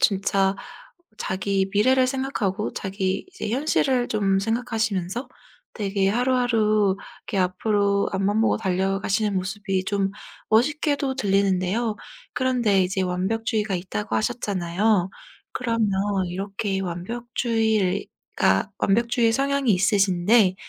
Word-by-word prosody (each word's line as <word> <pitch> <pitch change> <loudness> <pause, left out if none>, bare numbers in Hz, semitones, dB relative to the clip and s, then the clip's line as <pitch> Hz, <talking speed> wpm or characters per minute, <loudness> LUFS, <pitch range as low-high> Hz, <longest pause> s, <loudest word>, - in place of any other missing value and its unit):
진짜 195 -1 +2 0.6
자기 190 0 -1
미래를 255 +5 +4
생각하고 255 -7 -2
자기 190 -1 -2
이제 380 - -6
현실을 260 -1 +1
좀 195 -3 +1
생각하시면서 225 -1 -2 0.5
되게 195 -2 0
하루하루 220 -4 +2 0.4
앞으로 200 +2 +1
앞만 200 +3 +1
보고 230 - +2
달려가시는 195 +2 0
모습이 190 0 -2
좀 195 -1 0 0.4
멋있게도 280 +3 +1
들리는데요. 200 0 +1 0.4
그런데 235 -7 +2
이제 190 +1 -1
완벽주의가 210 +3 -1
있다고 190 +4 -3
하셨잖아요. 200 -4 0 0.4
그러면 230 -3 0 0.4
이렇게 195 +2 -3
완벽주의가 205 - -1
완벽주의 235 +2 +2
성향이 275 -2 +1
있으신데 195 0 +3
205 Hz, 280 characters per minute, -24 LUFS, 190-235 Hz, 0.6 s, 미래를